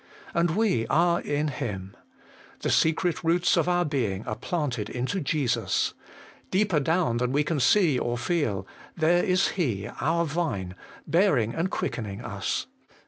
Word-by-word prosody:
And 170 Hz, -1 st, +1 dB
we 195 Hz, -, +1 dB
are 170 Hz, +4 st, +3 dB
in 150 Hz, +1 st, -1 dB
Him. 95 Hz, -8 st, -5 dB, 0.7 s
The -, -, 0 dB
secret 165 Hz, +1 st, +2 dB
roots 170 Hz, +2 st, +3 dB
of -, -, +2 dB
our 175 Hz, 0 st, +2 dB
being 115 Hz, -, -1 dB
are -, -, -3 dB
planted 130 Hz, -, -2 dB
into 130 Hz, +10 st, -2 dB
Jesus: 130 Hz, -, 0 dB, 0.6 s
deeper 190 Hz, -4 st, +2 dB
down 160 Hz, -4 st, +1 dB
than 125 Hz, +1 st, 0 dB
we 145 Hz, +2 st, +2 dB
can 155 Hz, 0 st, -1 dB
see 160 Hz, -2 st, +4 dB
or 120 Hz, 0 st, -1 dB
feel, 120 Hz, -, -1 dB, 0.3 s
there 175 Hz, +2 st, +3 dB
is 185 Hz, +1 st, +2 dB
He 115 Hz, -, -1 dB
our 170 Hz, +2 st, +2 dB
Vine, 145 Hz, -, -2 dB, 0.3 s
bearing 150 Hz, -, +2 dB
and 170 Hz, +3 st, -1 dB
quickening 110 Hz, -, -4 dB
us. 105 Hz, -3 st, -2 dB
150 Hz, 145 wpm, -26 LUFS, 115-175 Hz, 0.7 s, see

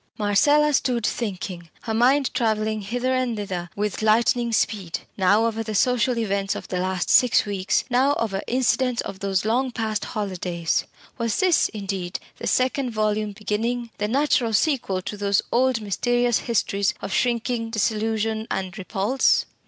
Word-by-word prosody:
Marcella 290 Hz, +9 st, +3 dB
stood 245 Hz, -4 st, +1 dB
thinking, 185 Hz, -6 st, -4 dB
her 225 Hz, -, -3 dB
mind 260 Hz, +4 st, +3 dB
travelling 220 Hz, -3 st, 0 dB
hither 245 Hz, +5 st, -1 dB
and 255 Hz, -3 st, 0 dB
thither 185 Hz, -4 st, -4 dB
with 210 Hz, +1 st, -2 dB
lightning 235 Hz, +2 st, +2 dB
speed, 205 Hz, -6 st, -1 dB
now 205 Hz, +4 st, +3 dB
over 225 Hz, -1 st, -1 dB
the 215 Hz, -1 st, -4 dB
social 250 Hz, +2 st, +2 dB
events 200 Hz, -3 st, -1 dB
of -, -, -7 dB
the 180 Hz, -, -2 dB
last 185 Hz, 0 st, -1 dB
six 250 Hz, -2 st, +5 dB
weeks 195 Hz, -2 st, 0 dB
now 265 Hz, +3 st, +2 dB
over 200 Hz, -4 st, -2 dB
incidents 250 Hz, 0 st, +1 dB
of 190 Hz, -, -7 dB
those 195 Hz, 0 st, -1 dB
long 250 Hz, +4 st, +1 dB
past 220 Hz, -3 st, -2 dB
holidays. 180 Hz, -5 st, -2 dB, 0.3 s
Was 230 Hz, -2 st, -1 dB
this, 370 Hz, -4 st, +3 dB
indeed, 195 Hz, -4 st, -4 dB, 0.2 s
the -, -, -4 dB
second 255 Hz, +1 st, +1 dB
volume 215 Hz, -1 st, -1 dB
beginning 230 Hz, +3 st, -2 dB
the 210 Hz, -, 0 dB
natural 255 Hz, -1 st, +1 dB
sequel 215 Hz, -, +1 dB
to 205 Hz, -, -5 dB
those 200 Hz, -1 st, +1 dB
old 255 Hz, -1 st, +2 dB
mysterious 240 Hz, +3 st, +1 dB
histories 200 Hz, -3 st, 0 dB
of 195 Hz, -, -5 dB
shrinking, 235 Hz, -1 st, 0 dB
disillusion, 220 Hz, 0 st, -1 dB
and 185 Hz, -2 st, -3 dB
repulse? 205 Hz, +7 st, +1 dB
220 Hz, 150 wpm, -23 LUFS, 200-245 Hz, 0.3 s, six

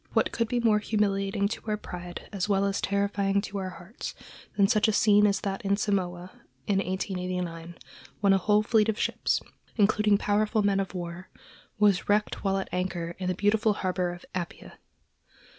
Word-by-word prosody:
What -, -, +2 dB
could 230 Hz, -2 st, 0 dB
be 245 Hz, +1 st, 0 dB
more 220 Hz, -3 st, +3 dB
humiliating 200 Hz, -2 st, 0 dB
to 225 Hz, -, -5 dB
our 210 Hz, -1 st, 0 dB
pride, 175 Hz, -3 st, -8 dB
as 200 Hz, +1 st, -2 dB
well 200 Hz, -1 st, +3 dB
as 200 Hz, 0 st, -1 dB
terrifying 200 Hz, 0 st, +1 dB
to 200 Hz, 0 st, -5 dB
our 190 Hz, -1 st, -3 dB
hearts, 175 Hz, +5 st, -8 dB, 0.4 s
than 200 Hz, -1 st, +5 dB
such 215 Hz, +2 st, +3 dB
a -, -, +3 dB
scene 210 Hz, 0 st, +5 dB
as 200 Hz, -1 st, 0 dB
that 195 Hz, -1 st, -3 dB
at 200 Hz, 0 st, +1 dB
Samoa, 185 Hz, -3 st, -1 dB, 0.3 s
in 200 Hz, -2 st, +1 dB
1889, 180 Hz, -3 st, -3 dB, 0.4 s
when 200 Hz, -2 st, +4 dB
a 195 Hz, -, +3 dB
whole 210 Hz, +3 st, +3 dB
fleet 220 Hz, 0 st, +3 dB
of 220 Hz, -, 0 dB
ships, -, -, 0 dB, 0.3 s
including 210 Hz, -1 st, +3 dB
powerful 210 Hz, +1 st, +1 dB
men 200 Hz, -1 st, +2 dB
of 195 Hz, -1 st, -3 dB
war, 175 Hz, +1 st, -6 dB, 0.5 s
was 205 Hz, -3 st, +3 dB
wrecked 210 Hz, +1 st, +1 dB
while 195 Hz, -1 st, +1 dB
at 195 Hz, -, -3 dB
anchor 175 Hz, -2 st, -3 dB
in 185 Hz, -, -3 dB
the 185 Hz, -, 0 dB
beautiful 210 Hz, +3 st, +2 dB
harbor 185 Hz, -2 st, -1 dB
of 175 Hz, 0 st, -10 dB
Apia. 175 Hz, -2 st, -6 dB
200 Hz, 180 wpm, -27 LUFS, 185-210 Hz, 0.5 s, than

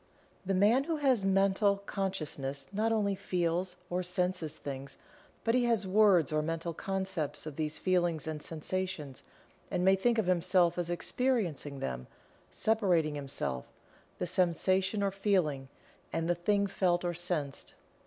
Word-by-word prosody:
The 195 Hz, -, +1 dB
Man 220 Hz, +8 st, +4 dB
who 330 Hz, 0 st, -1 dB
has 265 Hz, -8 st, +2 dB
Mental 195 Hz, +1 st, +3 dB
Consciousness 155 Hz, -9 st, -3 dB
not 220 Hz, +3 st, +1 dB
only 205 Hz, -3 st, +1 dB
"feels" 180 Hz, -1 st, -1 dB
or 180 Hz, +1 st, -1 dB
"senses" 180 Hz, -3 st, -1 dB
things, 135 Hz, -1 st, -7 dB, 0.5 s
but 230 Hz, -, +2 dB
he 250 Hz, 0 st, +3 dB
has 230 Hz, -4 st, +2 dB
words 190 Hz, -6 st, +4 dB
or 155 Hz, -, +2 dB
mental 165 Hz, +2 st, -3 dB
concepts 190 Hz, -6 st, -3 dB
of 155 Hz, -3 st, -6 dB
these 155 Hz, 0 st, -2 dB
feelings 175 Hz, -4 st, +1 dB
and 155 Hz, -1 st, -4 dB
sensations 160 Hz, -3 st, -4 dB, 0.5 s
and 180 Hz, -, 0 dB
may 190 Hz, 0 st, +6 dB
think 230 Hz, +5 st, +1 dB
of 220 Hz, -, +2 dB
himself 180 Hz, -1 st, +3 dB
as 175 Hz, -1 st, -1 dB
experiencing 175 Hz, -, -1 dB
them, 65 Hz, -1 st, -4 dB, 0.4 s
separating 185 Hz, -9 st, +2 dB
himself, 135 Hz, -, -3 dB, 0.5 s
the -, -, -2 dB
sensation 185 Hz, +3 st, +1 dB
or 200 Hz, -, +1 dB
feeling, 180 Hz, -9 st, 0 dB, 0.4 s
and 165 Hz, -, -1 dB
the 175 Hz, -, +3 dB
thing 200 Hz, +4 st, +1 dB
felt 180 Hz, -2 st, +1 dB
or 175 Hz, -, 0 dB
sensed. 170 Hz, -5 st, -3 dB
180 Hz, 145 wpm, -31 LUFS, 155-195 Hz, 0.5 s, may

